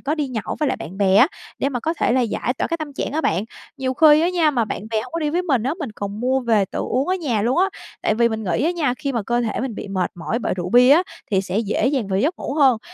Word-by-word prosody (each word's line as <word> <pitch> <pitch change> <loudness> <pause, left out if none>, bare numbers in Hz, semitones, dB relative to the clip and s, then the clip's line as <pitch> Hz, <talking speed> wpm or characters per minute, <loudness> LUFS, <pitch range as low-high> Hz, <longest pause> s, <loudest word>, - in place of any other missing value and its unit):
có 290 +2 -1
đi 295 -4 -2
nhậu 220 -5 -4
với 300 - +2
lại - - -1
bạn 185 +5 -9
bè 195 -1 +3
á, 255 +9 +7 0.3
để 275 - +1
mà 245 -4 -3
có 320 +6 -1
thể 240 - +1
là 255 - +3
giải 240 +1 -1
tỏa - - 0
cái 335 - -1
tâm 310 -3 -6
trạng 275 - -4
á 315 - 0
bạn. 190 - 0 0.3
Nhiều 260 -1 -2
khi 305 +1 +6
á 340 - +2
nha, 340 -4 +2
mà 245 -5 +1
bạn 210 - -5
bè 220 - +1
hông - - -11
có 335 - -2
đi 300 -1 0
với 355 +3 0
mình 270 -10 +1
á, 270 +6 -1
mình 275 -9 -5
còn 205 0 -6
mua 260 +2 +1
về 225 -5 +2
tự - - -6
uống 265 +5 -1
ở 370 - +2
nhà 260 - -1
luôn 245 +7 +1
á. 370 - +5 0.4
Tại - - +2
vì 235 +1 +3
mình 220 -1 -4
nghĩ 180 - 0
á 330 - +2
nha, 315 -8 0
khi 280 -1 -2
mà 230 -3 -1
cơ 240 +3 0
thể 225 -3 -2
mình 255 -4 -3
bị - - -7
mệt 190 -2 -1
mỏi 175 +6 -3
bởi 235 - -2
rượu 180 -1 -4
bia 250 +4 +6
á, 330 +5 +7 0.3
thì 190 -2 +3
sẽ 190 +1 -2
dễ 220 +2 0
dàng 260 -7 0
vào 190 -1 0
giấc 305 - +1
ngủ 280 - -4
hơn. 265 -7 +4
250 Hz, 320 wpm, -21 LUFS, 215-295 Hz, 0.4 s, á